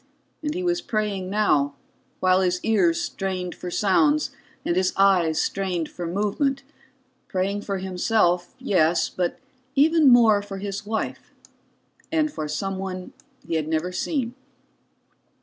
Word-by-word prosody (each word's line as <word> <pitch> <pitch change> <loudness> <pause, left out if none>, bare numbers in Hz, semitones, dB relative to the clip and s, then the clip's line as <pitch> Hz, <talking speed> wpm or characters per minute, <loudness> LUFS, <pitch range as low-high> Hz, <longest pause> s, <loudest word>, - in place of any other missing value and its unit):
And 300 0 -3
he 365 - -2
was 350 0 +1
praying 210 - -2
now, 150 -9 +2 0.5
while 185 0 +4
his 180 -1 +1
ears 330 +10 +3
strained 190 - -3
for 180 - -7
sounds 290 - +2 0.3
and 170 - +1
his 185 0 +1
eyes 180 -5 +4
strained 185 -5 -1
for 175 -1 -6
movement; 210 - 0 0.6
praying 195 +2 -1
for 200 -1 -3
himself, 185 -1 +1
yes, 170 -3 +2
but 180 -1 -2 0.4
even 310 +1 +5
more 230 -4 +6
for 200 -1 -7
his 200 +1 -5
wife, 220 0 -3 0.8
and 310 -2 +1
for 155 - -4
someone 190 +3 -4 0.3
he - - -3
had 155 -2 0
never 160 +3 -1
seen. 245 - -2
195 Hz, 130 wpm, -24 LUFS, 180-225 Hz, 0.8 s, more